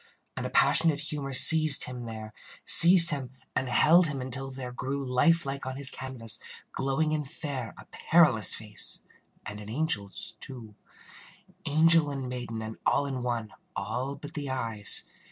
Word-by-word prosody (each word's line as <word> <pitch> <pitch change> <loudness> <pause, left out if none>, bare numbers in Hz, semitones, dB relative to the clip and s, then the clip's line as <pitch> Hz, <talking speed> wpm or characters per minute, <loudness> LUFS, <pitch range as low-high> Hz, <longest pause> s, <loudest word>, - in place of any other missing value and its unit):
And - - -5
a - - -9
passionate 160 -3 +2
humor 150 -2 -6
seized 155 +2 +7
him 125 -1 -8
there 110 -1 -10 0.3
Seized 170 0 +8
him 135 -3 -6 0.2
and 130 - -3
held 165 +7 +3
him 145 -3 -6
until 130 +1 -3
there 130 -2 -8
grew 135 +3 -6
Like 155 +6 +1
life 135 0 -6
on 130 - -6
his 140 -1 +1
canvas, 130 -4 -3 0.3
glowing 135 +3 -2
and 150 -3 -4
fair, 135 -8 -7
A - - -14 0.2
perilous 150 -11 +4
face 105 -1 -1 0.4
and 105 0 -9
an 105 0 -11
angel's, 110 -6 -3
too. 120 -5 -12 0.9
Angel 160 +1 +3
and 135 -2 -6
maiden, 120 -3 -7
and 110 0 -9
all 145 - 0
in 135 -2 -5
one, 120 -3 -5 0.2
All 130 +3 -5
but 145 +1 -12
the 145 -3 -6
eyes. 115 -6 -2
135 Hz, 160 wpm, -26 LUFS, 120-150 Hz, 0.9 s, Seized